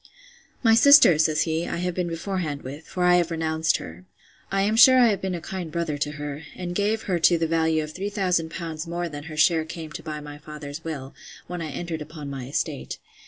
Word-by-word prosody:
My 225 -2 +6
sister, 275 - +7
says 155 -1 +3
he, 165 +1 -2
I - - -3
have 180 +1 -2
been 180 0 -2
beforehand 165 -3 -3
with; 145 +5 -8
for 180 - -3
I 180 0 +5
have 175 -1 +1
renounced 160 -1 0
her. 85 +3 -10 0.5
I 195 0 +1
am 210 +2 +1
sure 255 +3 +8
I 245 -2 +6
have 200 - -1
been 190 -1 -2
a 170 - -6
kind 175 -1 -6
brother 170 -3 -2
to 150 +1 -2
her; 145 0 -6
and 175 -1 -5
gave 210 +4 0
her 180 -3 -1
to 170 +1 +5
the 165 - 0
value 160 -1 +1
of 155 0 -8
3000L. 175 -5 -2
more 175 +1 -3
than 145 -2 -8
her 155 -2 -8
share 160 +1 +4
came 160 -1 -8
to - - -7
by 155 -1 -5
my 145 0 -9
father's 150 0 -8
will, 140 -5 -6 0.3
when 175 -1 -6
I 160 - -4
entered 165 +1 -5
upon 150 -2 -8
my 130 -2 -6
estate. 65 - -3
165 Hz, 220 wpm, -24 LUFS, 150-180 Hz, 0.5 s, sure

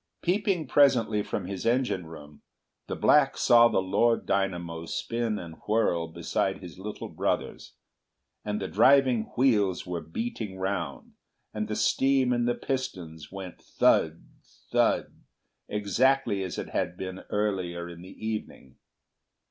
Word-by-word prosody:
Peeping 185 -2 +1
presently 125 -6 +3
from 100 - -4
his 95 0 -5
engine 120 -8 0
room 75 -2 -12 0.5
the - - -3
black 145 -2 +4
saw 120 -2 +6
the 95 - +1
Lord 115 +5 +2
Dynamo 85 -4 -2
spin 115 +3 -2
and 85 -4 -8
whirl 95 -6 +1
beside 85 +3 -2
his 90 -1 -11
little 105 +2 -6
brothers, - - -3 0.7
and 105 0 -2
the - - -3
driving 130 -5 +4
wheels 105 -8 +2
were 90 -2 -4
beating 105 +1 -5
round, 95 -6 -4 0.4
and 105 0 -3
the 105 - -3
steam 135 0 +2
in 120 -1 +1
the 120 0 +1
pistons 90 - -5
went 95 -2 -8
thud, 80 +1 +2 0.5
thud, - - +1 0.5
exactly 105 +2 +1
as 95 -3 -4
it - - -5
had 90 0 -2
been 95 0 -5
earlier 95 -5 -2
in 85 0 -10
the 95 +4 -8
evening. 105 -11 -6
100 Hz, 135 wpm, -27 LUFS, 90-120 Hz, 0.7 s, saw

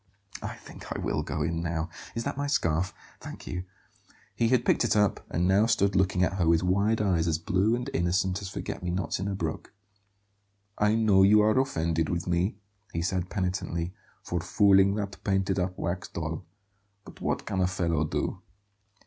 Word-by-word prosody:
"I - - -5
think - - -12
I - - -2
will - - -1
go - - -2
in 85 0 -1
now. 85 -1 -2 0.3
Is 115 - -2
that - - -3
my 145 +1 -2
scarf? 85 - +1 0.3
Thank - - -9
you." 90 0 -4 0.7
He 115 - +2
had 120 0 +2
picked - - +3
it 120 - +2
up, 105 -1 +2
and 90 +2 +1
now 100 +4 +4
stood 100 -3 +2
looking 95 -1 +2
at 95 +1 0
her 85 - +2
with 80 0 +4
wide 100 +5 +2
eyes 90 -5 +1
as 80 -2 +2
blue 95 +7 +1
and 125 +1 -4
innocent 95 -1 +1
as 100 - -5
forget - - -5
me 90 - -3
nots 90 +2 -1
in 95 - -2
a 100 - -2
brook. 80 0 -4 1.0
"I 105 +1 +2
know 110 -4 +4
you 105 +2 +7
are 110 0 +3
offended 80 - 0
with 85 -1 -2
me," 90 +3 0 0.3
he 85 - -2
said 90 0 -1
penitently, 90 -3 -2 0.3
"for 85 - -2
fooling 100 +2 +4
that 100 -2 -5
painted 95 -1 +1
up 90 0 -2
wax 85 +2 -3
doll; 80 +1 -5 0.6
but - - -13
what - - -1
can 95 - -2
a 90 - +3
fellow 85 -4 0
do?" 75 - -2
95 Hz, 190 wpm, -28 LUFS, 85-100 Hz, 1.0 s, you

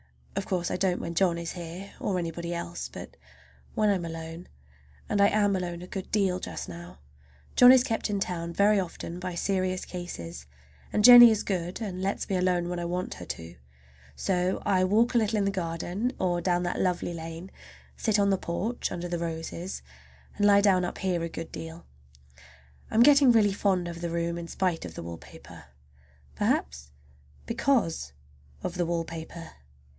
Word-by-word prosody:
Of - - -3
course 180 -2 -1
I - - -1
don't 185 -1 +1
when 170 - -4
John 170 0 +2
is 170 0 -4
here, 175 +3 -8
or 195 -3 -1
anybody 170 0 -3
else, 170 0 -5
but - - -10 0.6
when 215 -1 +3
I - - +4
am 175 -2 -3
alone. 165 +1 -7 0.6
And 205 -1 +1
I 200 - +7
am 205 -1 +2
alone 175 -2 -4
a - - -9
good 190 0 -6
deal 190 -3 +1
just - - -6
now. 85 +1 -10 0.6
John 250 0 +9
is 260 -1 +6
kept 225 -3 -2
in 205 -1 -1
town 170 -3 -3
very 200 +3 +4
often 175 -1 -5
by 180 -1 -5
serious 185 0 -1
cases, 85 - -7 0.4
and 210 - +1
Jennie 240 0 +11
is 220 -2 +1
good 180 +1 -3
and 185 -4 -4
lets 195 +1 -2
me 190 - 0
alone 180 -1 +1
when 175 0 -3
I 175 - -3
want 180 +1 -3
her 90 - -9
to. 85 0 -7 0.6
So 180 0 0
I 190 -2 +3
walk 220 +6 +3
a 240 - +4
little 220 0 0
in 200 - +1
the 200 - +1
garden 185 +6 -2
or 175 -2 0
down 175 -1 +1
that 175 - -2
lovely 180 -1 0
lane, 165 +2 -7 0.4
sit 215 -2 +1
on 200 -1 +3
the 195 - +2
porch 200 +8 -3
under 175 0 -4
the 175 -1 -2
roses, 165 - -5 0.5
and 205 0 +3
lie 200 0 +6
down 190 -3 +4
up 175 - -3
here 180 -3 0
a 165 - -3
good 165 0 -7
deal. 165 +1 -8 1.0
I'm 225 - +5
getting 280 -1 +7
really 210 -4 +4
fond 190 -3 +1
of 170 0 -7
the 170 - -2
room 170 0 -2
in 170 - -6
spite 180 -2 -1
of 80 -2 -9
the - - -6
wallpaper. 85 0 -11 0.7
Perhaps 70 0 -1 0.6
because 230 - 0 0.5
of - - -3
the 175 -1 0
wallpaper. 165 0 -5
180 Hz, 185 wpm, -28 LUFS, 170-200 Hz, 1.0 s, Jennie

